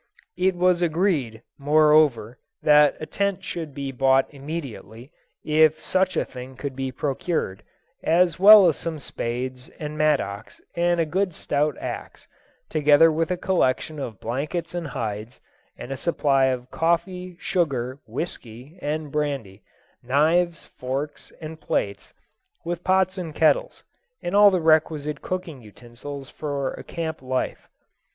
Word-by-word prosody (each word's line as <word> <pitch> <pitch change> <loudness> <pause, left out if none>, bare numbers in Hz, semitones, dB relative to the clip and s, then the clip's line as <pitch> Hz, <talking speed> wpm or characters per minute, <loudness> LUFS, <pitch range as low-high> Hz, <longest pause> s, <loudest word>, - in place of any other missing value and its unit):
It 185 0 +2
was 180 0 +2
agreed, 160 - 0 0.2
moreover, 150 -5 +3 0.2
that 150 -1 +5
a 155 - -5
tent 195 +3 -2
should 165 -5 -5
be 140 -1 -4
bought 135 +1 +3
immediately, 135 - -7 0.3
if 155 0 +4
such 185 +3 0
a - - +1
thing 125 +1 -10
could 140 0 -5
be 135 0 -3
procured, 135 - -2 0.4
as 170 0 +2
well 205 0 +10
as 160 - +1
some 165 -2 -4
spades, 125 -1 -5
and 150 -2 -6
mattocks, 115 -9 0
and 175 0 +1
a 165 - +2
good 180 +2 -1
stout 145 0 -1
axe, - - -7 0.4
together 150 +1 +5
with 160 +2 -1
a 180 - -1
collection 155 -4 0
of 115 -7 -6
blankets 145 +10 -3
and 175 -2 -3
hides, 110 -2 -5 0.4
and 130 - -8
a 135 - -3
supply 140 -5 +2
of 130 -1 -2
coffee, 180 +2 -1
sugar, 135 -9 -1
whisky, 125 +3 -7
and 150 0 -3
brandy; 135 -10 -3 0.4
knives, 160 +7 +1
forks, 135 +4 -5
and 160 0 -8
plates, 100 0 -2 0.5
with 175 +1 -4
pots 190 0 +2
and 165 -4 -6
kettles, - - +2 0.4
and 175 - -2
all 205 0 +8
the 185 -3 0
requisite 155 -2 +2
cooking 175 -7 -5
utensils 120 +5 -10
for 140 -3 -3
a - - -9
camp 160 -3 -5
life. 130 0 -3
150 Hz, 140 wpm, -24 LUFS, 130-170 Hz, 0.5 s, well